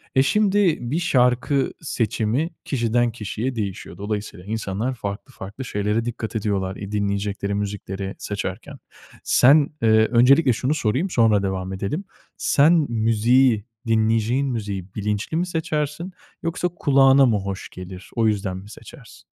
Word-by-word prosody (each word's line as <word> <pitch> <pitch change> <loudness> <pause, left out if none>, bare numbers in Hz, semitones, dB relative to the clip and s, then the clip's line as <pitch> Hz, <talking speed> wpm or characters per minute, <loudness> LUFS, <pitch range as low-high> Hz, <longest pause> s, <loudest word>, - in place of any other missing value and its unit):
E, 130 - +5
şimdi 200 -1 +2
bir 160 - +1
şarkı 130 -3 +2
seçimi 120 +2 -1 0.2
kişiden 120 -2 +1
kişiye 115 +3 -4
değişiyor. 100 -4 -5
Dolayısıyla 105 -2 -5
insanlar 110 +3 -2
farklı 105 +5 -6
farklı 105 +7 -8
şeylere 105 +1 -1
dikkat 115 -1 -5
ediyorlar 100 -3 -1
i 100 0 -7
dinleyecekleri 100 -1 -2
müzikleri 100 -1 -4
seçerken. 105 +7 -5 0.5
Sen, 140 +3 +5
eee, 115 - +3 0.2
öncelikle 125 +3 +5
şunu 130 +6 0
sorayım, 140 - 0
sonra 110 - +3
devam 95 0 -3
edelim. 100 - -3 0.3
Sen 150 +4 +4 0.2
müziği, 115 +1 +3 0.2
dinleyeceğin 115 +4 +2
müziği 100 -6 -4
bilinçli 105 +8 -2
mi 175 - +1
seçersin 160 +1 -3 0.3
yoksa 170 +2 -1
kulağına 135 -4 +4
mı 115 -4 +2
hoş 95 0 -5
gelir? 90 0 -10
O 115 -1 +2
yüzden 100 -3 -1
mi 100 +2 -11
seçersin? - - -14
115 Hz, 135 wpm, -22 LUFS, 100-135 Hz, 0.5 s, E